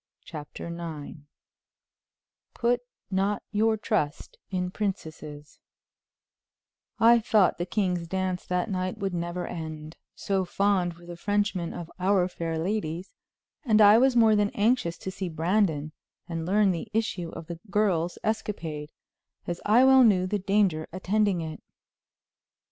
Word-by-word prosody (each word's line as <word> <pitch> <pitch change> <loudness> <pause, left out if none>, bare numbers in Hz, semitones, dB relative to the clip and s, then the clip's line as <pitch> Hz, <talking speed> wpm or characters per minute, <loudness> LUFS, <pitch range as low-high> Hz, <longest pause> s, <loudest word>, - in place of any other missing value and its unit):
CHAPTER 150 -3 -8
IX 165 -3 -7 1.4
Put 240 +1 +2 0.3
not 195 +2 0
your 220 +1 +2
Trust 205 -9 -2
in 180 -1 -2
Princesses 155 -7 -5 1.4
I 235 +1 +6
thought 215 -6 +3
the 175 - -2
king's 180 -4 -1
dance 185 0 -2
that 180 0 0
night 185 +1 -2
would 195 -3 -3
never 175 +1 -3
end, 155 -2 -7 0.2
so 195 -1 -1
fond 185 -1 +1
were 170 +1 -16
the 175 0 -8
Frenchmen 205 -2 -1
of 170 -1 -7
our 185 -1 +3
fair 165 -3 -4
ladies, 180 0 -3 0.5
and 220 -6 +3
I 210 +1 +8
was 260 0 +4
more 225 -2 +6
than 205 -1 +2
anxious 205 -6 +1
to 190 - -6
see 190 -1 -4
Brandon 160 -2 0 0.4
and 165 -2 -4
learn 200 +1 +3
the 170 +4 -4
issue 205 -6 -1
of - - -8
the 170 0 -7
girls' 190 -5 +1
escapade, 165 -9 -3 0.5
as 175 0 -4
I 235 +5 +6
well 265 -1 +7
knew 190 -6 +4
the 205 +2 -1
danger 195 -5 +1
attending 190 0 +1
it. 160 -1 -6
185 Hz, 135 wpm, -27 LUFS, 170-210 Hz, 1.4 s, I